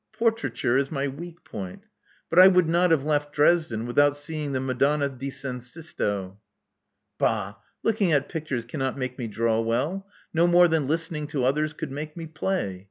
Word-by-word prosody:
Portraiture 225 - +1
is 135 0 -2
my 140 -2 -1
weak 170 +5 -8
point. 95 -4 -7 0.5
But 170 - +5
I 185 - +11
would 180 -3 +4
not 175 +2 +3
have 160 -4 +3
left 145 -1 0
Dresden 145 -7 +2
without 145 +4 +3
seeing 150 -1 -4
the 130 - -1
Madonna 140 +3 +1
di 135 +1 -6
San 130 -2 -5
Sisto." 105 - -4 0.8
Bah! - - 0 0.3
Looking 210 -5 +2
at 145 -2 +2
pictures 150 -8 -4
cannot 135 +1 -3
make 130 -1 -4
me 120 - -3
draw 115 +1 0
well, 145 +13 -1 0.3
no 170 +1 +4
more 175 0 +6
than 160 -4 +1
listening 160 -1 -2
to 135 -4 -1
others 150 +4 +1
could 150 -1 -6
make 150 +3 -6
me 165 - -5
play. 160 - -2
145 Hz, 175 wpm, -25 LUFS, 130-165 Hz, 0.8 s, I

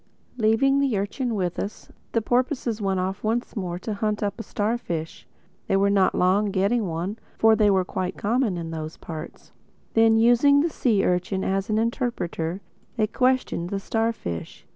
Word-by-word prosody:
Leaving 245 +5 +3
the 270 -6 +1
urchin 225 +4 -2
with 180 -3 -2
us, 205 - -6 0.2
the 230 - +1
porpoises 245 -2 0
went 195 -2 0
off 190 +1 -3
once 230 +3 -1
more 180 -4 -3
to 210 +4 -4
hunt 210 +1 -1
up 205 +3 -2
a - - -4
starfish. 205 -9 -3 0.4
They 195 - +2
were 200 +1 +3
not 195 -2 +3
long 190 +3 +3
getting 200 +3 +1
one, 175 +6 -3 0.2
for 225 0 +5
they 210 -1 +4
were 190 -2 +3
quite 185 0 -3
common 220 -3 0
in 165 -1 -5
those 155 0 -6
parts. 160 -2 -9 0.4
Then, 225 0 +5
using 245 +5 +5
the 330 +1 0
sea 220 -9 +1
urchin 180 +2 0
as 195 +2 -1
an 215 - +1
interpreter, 220 - -2 0.4
they 215 - +3
questioned 250 -7 0
the 200 - -2
starfish. 225 - -3
210 Hz, 170 wpm, -24 LUFS, 185-230 Hz, 0.4 s, for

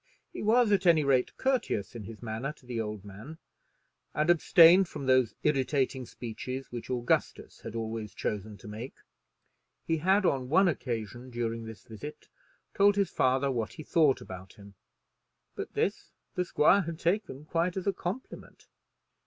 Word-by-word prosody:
He - - -6
was, 225 +1 +4
at 195 -2 +3
any 160 -3 +5
rate, 135 -3 +1
courteous 255 - 0
in 115 -4 -7
his 115 +2 -10
manner 115 +5 -3
to 145 - -23
the 120 -2 -3
old 105 -2 -5
man, 110 +11 -10 0.8
and 155 +3 +3
abstained 175 +2 +7
from 145 -4 -7
those 130 -3 +3
irritating 135 -3 0
speeches 125 +3 -6
which 120 -1 -7
Augustus 120 -2 -1
had - - -8
always 110 -1 -4
chosen 105 0 -4
to 105 - -13
make. 110 +5 -7 0.9
He 165 - +1
had 190 +5 +3
on 130 -6 +1
one 190 +6 +5
occasion 120 - -3
during 115 -1 -3
this 110 -1 -10
visit 130 +7 -9 0.4
told 200 0 +4
his 200 -1 +1
father 130 +2 +2
what 115 -4 -2
he 155 - -9
thought 150 -4 +3
about 95 0 -9
him, 100 -1 -14 0.8
but - - -7
this - - -1 0.2
the 180 - -1
squire 180 +4 +4
had 170 -3 -5
taken 170 -5 -1
quite 170 +3 -1
as 190 - -3
a 200 - +2
compliment. 190 +8 -7
130 Hz, 160 wpm, -29 LUFS, 115-170 Hz, 0.9 s, abstained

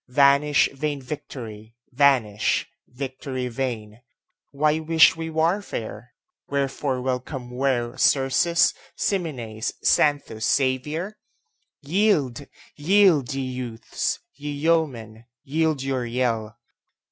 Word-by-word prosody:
Vanish 140 +2 +4
vain 145 +1 -2
victory! 115 -6 -8 0.2
vanish, 125 -6 +2 0.2
victory 130 0 -5
vain! 115 -3 -4 0.5
Why 150 +2 +1
wish 160 0 +5
we 165 0 -5
warfare? 160 - -2 0.3
Wherefore 140 -1 -1
welcome 125 0 -3
were 125 -2 0
Xerxes, 140 +5 +3 0.2
Ximenes, 125 - -2
Xanthus, 140 -7 +2
Xavier? 150 +9 -2 0.6
Yield, 150 - +1 0.3
yield, 165 -4 +4
ye 135 - -2
youths! 125 -3 -3 0.2
ye 145 +1 -7
yeomen, 140 -8 -1 0.2
yield 155 -1 0
your 135 -2 -1
yell! 115 -3 -1
135 Hz, 90 wpm, -24 LUFS, 125-150 Hz, 0.6 s, wish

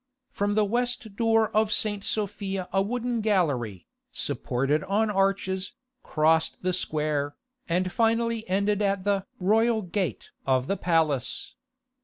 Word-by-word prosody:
From 205 0 -1
the 215 -1 +4
west 240 -1 -1
door 225 -1 +2
of 215 0 +3
St. 205 -1 0
Sophia 195 -3 -2
a 195 - +3
wooden 240 +2 -1
gallery, 140 - 0 0.3
supported 135 +5 -1
on 210 +2 +1
arches, 195 -1 0 0.3
crossed 160 +2 +1
the 185 0 +1
square, 150 -4 -1 0.3
and 180 +2 +1
finally 230 -1 +1
ended 200 +2 +1
at 200 -2 +1
the 200 -1 0
"Royal 220 +3 +3
Gate" 185 -2 -3
of 130 -1 +2
the 195 - 0
palace. 160 -8 0
195 Hz, 130 wpm, -27 LUFS, 165-215 Hz, 0.3 s, the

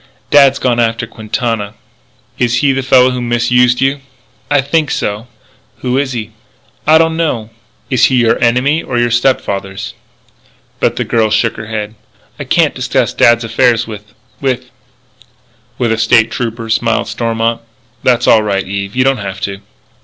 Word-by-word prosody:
"Dad's 140 -2 +6
gone 125 -3 0
after 115 0 0
Quintana." 110 -1 -4 0.6
"Is 120 -1 +1
he 145 -2 +3
the 135 0 -1
fellow 130 -1 +4
who 125 0 -3
misused 120 +1 +2
you?" 135 +1 +1 0.5
"I 145 -1 +3
think 145 +2 0
so." 105 +3 -3 0.5
"Who 125 0 -1
is 135 -2 -2
he?" 110 -2 -5 0.6
"I 155 +1 +7
don't 160 0 +2
know." 125 -10 -2 0.4
"Is 125 -1 +4
he 130 - +2
your 120 -2 +2
enemy 125 +7 +2
or 125 - -4
your 120 0 +1
stepfather's?" 100 -6 -1 0.9
But - - +1
the - - -1
girl 110 -2 +1
shook 115 +1 +1
her 110 - -8
head: 110 -1 -4 0.5
"I - - -5
can't - - +2
discuss - - -1
dad's 120 0 +4
affairs 115 0 +2
with 105 -1 -10 0.3
with 130 -2 -2 0.5
" - - -32
"With 120 -2 0
a 115 - 0
State 115 0 +3
Trooper," 115 -1 -4
smiled 115 0 0
Stormont. 115 0 -1 0.4
"That's 125 -1 +2
all 110 - +5
right, 100 -3 -2
Eve. 100 +2 -4
You 130 - +3
don't 135 0 +2
have 100 -3 -6
to." 100 -1 -4
120 Hz, 165 wpm, -14 LUFS, 110-130 Hz, 0.9 s, I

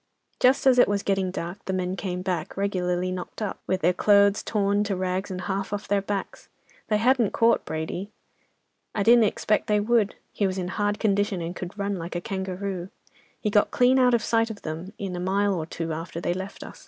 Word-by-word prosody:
Just 255 +2 +4
as 255 -2 +6
it - - +7
was 200 0 0
getting 195 -2 +1
dark, 180 +2 -6
the 190 - -2
men 185 0 -1
came 180 -2 -4
back, 180 -3 -3
regularly 185 -2 0
knocked 185 0 -6
up, 210 -3 -3
with 185 0 0
their 180 +2 +3
clothes 200 +2 +4
torn 205 -1 +1
to 200 -2 -1
rags 185 +2 -2
and 185 -1 -4
half 195 +1 -3
off 205 0 -4
their 200 0 +2
backs. 200 0 -5 0.4
They 215 - +2
hadn't 235 -1 +3
caught 230 0 +3
Brady. 160 +5 -4 0.9
I 205 - +1
didn't 235 +1 +6
expect 210 +1 0
they 210 -1 +3
would—he 210 -2 0
was 190 0 -3
in 180 -1 -2
hard 205 +1 0
condition, 205 -2 +1
and 170 +1 -4
could 180 +2 -7
run 200 -1 -1
like 170 +1 -6
a 175 - -1
kangaroo. 190 -2 -4 0.5
He 210 - -1
got 205 0 +4
clean 255 +1 +4
out 250 -1 +5
of 230 - 0
sight 230 0 +2
of 215 -2 -8
them 165 +4 -5
in 195 -3 -4
a - - -4
mile 200 +2 +1
or 160 -4 -3
two 165 -1 -4
after 165 +1 -5
they 175 0 -1
left 190 +2 -6
us. - - -11
195 Hz, 215 wpm, -25 LUFS, 180-210 Hz, 0.9 s, it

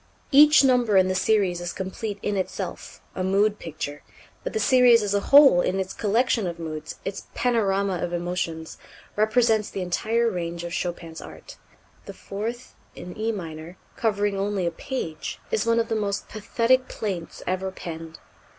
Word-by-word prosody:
Each 295 +1 +7
number 245 -6 +3
in 185 0 +4
the - - +1
series 185 -3 +1
is 175 0 -3
complete 200 +2 -5
in 205 - -1
itself, 190 -2 -5
a 185 - -3
mood 200 +3 +2
picture; 145 -2 -6 0.4
but - - -3
the 440 - 0
series 250 - +5
as 205 -1 -1
a 200 - +3
whole, 275 -10 +8
in 190 +2 0
its 190 0 -3
collection 225 -1 +1
of 170 -1 -5
moods, 155 -2 -6
its 195 - -5
panorama 200 -6 +1
of 175 - -3
emotions, 175 -2 -3 0.4
represents 220 0 +2
the 195 - -5
entire 225 +6 0
range 170 -4 -3
of 170 -1 -5
Chopin's 170 -2 -4
art. - - -12 0.5
The - - -8
fourth 230 +5 -6 0.2
in 180 - -9
E 220 +1 -1
minor, 165 -3 -7 0.2
covering 205 -2 0
only 195 -1 -1
a 170 - 0
page, 165 - -5
is 455 - 0
one 230 0 +3
of 230 - 0
the 225 - -1
most 205 -2 -2
pathetic 230 +4 +1
plaints 185 -6 -5
ever 185 +1 -1
penned. 165 -3 -8
200 Hz, 170 wpm, -25 LUFS, 175-230 Hz, 0.5 s, whole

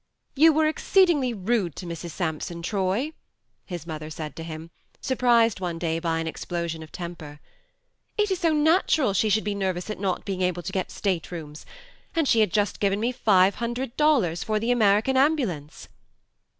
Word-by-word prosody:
" - - -48
You 325 - +9
were 310 +1 +2
exceedingly 315 -4 +3
rude 200 -5 -1
to 185 - -7
Mrs. 170 0 -6
Sampson, 170 0 -4
Troy," 200 - -1 0.5
his 175 -4 -6
mother 155 -2 -6
said 155 -2 -7
to - - -7
him, 160 0 -8 0.3
surprised 240 -5 +2
one 175 -3 -3
day 165 -1 -1
by 165 -1 -1
an 165 - -2
explosion 165 0 -4
of 155 - -11
temper. 160 -4 -8 0.4
" - - -48
It 420 -1 +1
is 375 - 0
so 335 -3 +2
natural 310 - +3
she 215 +3 +2
should 215 +1 +2
be 205 - -1
nervous 190 0 -2
at 215 - -6
not 190 -2 -2
being 190 -2 -3
able 180 -1 0
to - - -4
get 190 - -2
state 185 -5 -2
rooms; 155 -3 -8 0.5
and 325 -3 +2
she 230 - +4
had 215 -5 +3
just 205 0 0
given 200 0 +1
me 235 +3 0
five 200 -6 +4
hundred 240 +1 -3
dollars 235 - +2
for 215 -1 0
the 230 +3 0
American 220 +2 +3
ambulance." 245 - 0
195 Hz, 190 wpm, -25 LUFS, 170-245 Hz, 0.5 s, You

